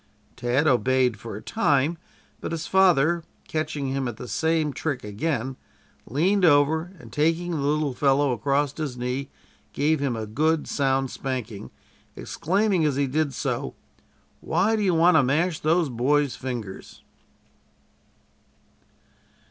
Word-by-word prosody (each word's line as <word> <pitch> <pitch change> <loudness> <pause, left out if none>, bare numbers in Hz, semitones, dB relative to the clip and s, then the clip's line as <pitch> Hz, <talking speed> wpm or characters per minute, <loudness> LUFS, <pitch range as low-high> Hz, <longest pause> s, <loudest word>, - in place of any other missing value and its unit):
Tad 125 +4 0
obeyed 130 -4 +2
for 115 0 -7
a 105 - -8
time, 150 - +1 0.4
but - - -5
his 165 -1 -3
father, 170 -3 +3 0.2
catching 155 -3 -2
him 135 -1 -1
at 120 -3 -5
the 125 - -8
same 160 +5 0
trick 145 -4 -3
again, 130 +4 -3 0.5
leaned 185 - +1
over, 160 +2 +3
and - - -13
taking 165 +3 +1
the 165 - -1
little 145 0 0
fellow 140 +1 +2
across 140 +4 0
his 145 -6 -4
knee, 125 +2 -3 0.4
gave 155 +2 +1
him 140 -4 -1
a 110 -1 -4
good, 155 +8 0
sound 135 -2 0
spanking, 120 -6 -5 0.5
exclaiming 195 0 0
as 150 -3 +1
he 140 +1 +1
did 145 +2 0
so: - - -3 0.6
"Why 220 +4 +1
do 215 - -1
you 185 -4 +2
want 165 +1 +5
to - - +6
mash 155 +5 +1
those 165 +1 +2
boys' 135 +3 +1
fingers?" 120 -7 -7
145 Hz, 140 wpm, -25 LUFS, 130-160 Hz, 0.6 s, to